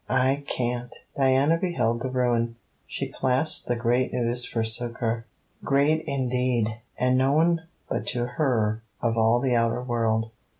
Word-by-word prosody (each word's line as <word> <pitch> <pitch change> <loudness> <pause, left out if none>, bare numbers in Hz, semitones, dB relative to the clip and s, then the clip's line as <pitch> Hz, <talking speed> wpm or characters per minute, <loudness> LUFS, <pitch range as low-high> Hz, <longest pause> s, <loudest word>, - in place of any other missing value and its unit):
I 130 +2 +2
can't!' 120 0 -2 0.2
Diana 135 +4 +3
beheld 120 -11 0
the 130 - -2
ruin. 120 -2 0 0.3
She - - -3
clasped 130 +4 0
the 120 - +1
great 120 +2 +1
news 120 0 +1
for 115 - -2
succour. 115 0 0 0.4
Great 145 +3 +2
indeed: 125 -4 0 0.2
and 125 +1 +2
known 160 +5 +3 0.3
but - - -3
to 120 -1 0
her 120 -6 0 0.2
of 115 -1 0
all 115 +1 +3
the 125 -1 +1
outer 115 +1 +1
world. 115 -2 0
125 Hz, 140 wpm, -25 LUFS, 115-130 Hz, 0.4 s, Diana